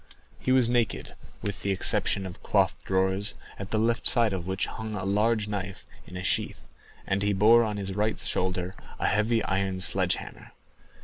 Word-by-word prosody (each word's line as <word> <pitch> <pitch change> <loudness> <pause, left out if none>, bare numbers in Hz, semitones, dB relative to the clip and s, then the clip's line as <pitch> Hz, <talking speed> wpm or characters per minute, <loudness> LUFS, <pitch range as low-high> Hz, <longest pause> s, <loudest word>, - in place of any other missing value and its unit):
He 130 - -1
was 130 -2 +4
naked, 120 -2 0 0.3
with 100 -2 -4
the 100 - -2
exception 95 0 +2
of 90 -1 -9
cloth - - +2
drawers 95 +1 +1 0.2
at 100 0 -6
the 110 - 0
left 115 +1 +1
side 115 -4 +3
of 90 -2 -4
which 95 0 -1
hung 110 -1 -6
a 95 -2 -4
large 105 +2 +1
knife 100 -2 -5 0.2
in 90 - -8
a 90 - -5
sheath, - - -2 0.4
and 100 +1 0
he 100 0 +2
bore 110 +4 +6
on 105 -2 -2
his 95 -1 -2
right 105 +2 0
shoulder 90 0 -1 0.2
a - - -2
heavy 110 +2 +2
iron 95 -1 -1
sledge 90 - +3
hammer. - - -11
100 Hz, 185 wpm, -27 LUFS, 95-110 Hz, 0.4 s, bore